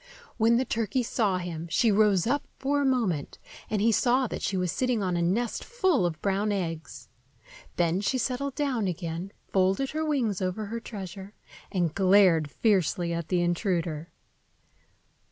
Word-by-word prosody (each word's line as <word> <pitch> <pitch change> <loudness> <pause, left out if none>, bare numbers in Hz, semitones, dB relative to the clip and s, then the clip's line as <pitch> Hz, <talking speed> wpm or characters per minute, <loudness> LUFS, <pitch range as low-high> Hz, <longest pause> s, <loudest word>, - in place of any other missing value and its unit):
When 230 +1 +4
the 260 - +1
turkey 230 +3 -1
saw 210 -5 0
him, 170 -2 -5
she 225 +6 +3
rose 205 -3 +3
up 275 +5 0
for 285 +1 0
a - - +1
moment, 220 - 0 0.3
and 210 -1 0
he 230 - +4
saw 250 +3 +3
that - - -5
she 190 - -1
was 180 -2 0
sitting 250 -5 0
on 180 -2 0
a 170 - 0
nest 215 +7 0
full 375 - +1
of 160 -3 -5
brown 200 +1 +1
eggs. 165 -7 -4 0.7
Then 175 +2 +1
she 255 +5 0
settled 260 +2 -2
down 265 -8 0
again, 175 +1 -4 0.2
folded 195 +8 +1
her 315 +1 -2
wings 250 - 0
over 185 +3 -2
her 230 +3 -4
treasure, 195 -2 -8 0.4
and 175 -5 0
glared 185 -5 +4
fiercely 180 -3 +1
at 170 -1 -3
the 175 +1 +1
intruder. 170 -3 -1
200 Hz, 165 wpm, -27 LUFS, 175-240 Hz, 0.7 s, When